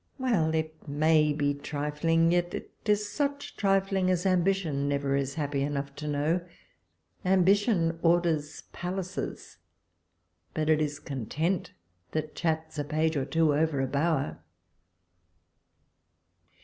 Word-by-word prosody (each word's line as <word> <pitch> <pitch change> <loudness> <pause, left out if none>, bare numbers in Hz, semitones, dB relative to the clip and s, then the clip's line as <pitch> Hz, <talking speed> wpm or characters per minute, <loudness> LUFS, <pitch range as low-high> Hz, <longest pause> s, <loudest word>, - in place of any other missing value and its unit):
— - - -41
Well! 200 - +1
it 155 0 -3
may 150 +1 +3
be 145 -1 +1
trifling; 150 +3 0
yet 175 0 +1
it - - -7 0.2
is 210 0 +2
such 280 +3 -2
trifling 195 -1 +2
as 180 0 +1
Ambition 180 -6 +1
never 140 -1 0
is 140 0 -1
happy 145 -3 -1
enough 140 0 -2
to 150 - -5
know! 150 +4 +1 0.8
Ambition 185 -2 +3
orders 165 -3 +1
palaces, 185 +1 -5 1.0
but 155 -2 0
it 155 0 +3
is 145 -1 -1
Content 155 - -2 0.4
that 155 -1 -2
chats 160 -2 -2
a - - 0
page 155 +2 0
or 135 -2 0
two 160 0 +2
over 155 -1 +1
a 135 - +2
bower. 145 +1 0
160 Hz, 125 wpm, -28 LUFS, 145-180 Hz, 1.0 s, may